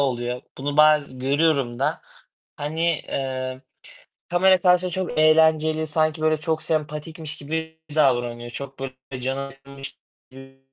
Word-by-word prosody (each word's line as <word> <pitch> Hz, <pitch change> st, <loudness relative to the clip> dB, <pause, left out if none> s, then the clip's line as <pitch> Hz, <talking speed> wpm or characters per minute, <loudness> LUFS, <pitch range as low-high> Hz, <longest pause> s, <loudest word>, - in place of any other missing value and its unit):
oluyor. 125 Hz, -2 st, -1 dB, 0.2 s
Bunu 145 Hz, +2 st, -3 dB
baz 150 Hz, -3 st, +4 dB
görüyorum 140 Hz, -2 st, +1 dB
da. 135 Hz, -, 0 dB, 0.6 s
Hani, 150 Hz, +3 st, -4 dB, 0.3 s
eee, 130 Hz, -1 st, -3 dB, 0.7 s
kamera 185 Hz, +2 st, +5 dB
karşısında 180 Hz, 0 st, +3 dB
çok 160 Hz, -, -3 dB
eğlenceli 155 Hz, 0 st, +4 dB
sanki 155 Hz, 0 st, +1 dB
böyle 155 Hz, 0 st, +3 dB
çok 155 Hz, +1 st, -1 dB
sempatikmiş 155 Hz, +1 st, -3 dB
gibi 160 Hz, +2 st, -5 dB, 0.2 s
davranıyor. 120 Hz, -4 st, +1 dB
Çok 135 Hz, +2 st, -7 dB
böyle 135 Hz, -1 st, -5 dB, 0.3 s
cana 135 Hz, +2 st, -2 dB
yakınmış 135 Hz, 0 st, -11 dB, 0.3 s
gibi, 135 Hz, 0 st, -14 dB
145 Hz, 125 wpm, -23 LUFS, 135-160 Hz, 0.7 s, kamera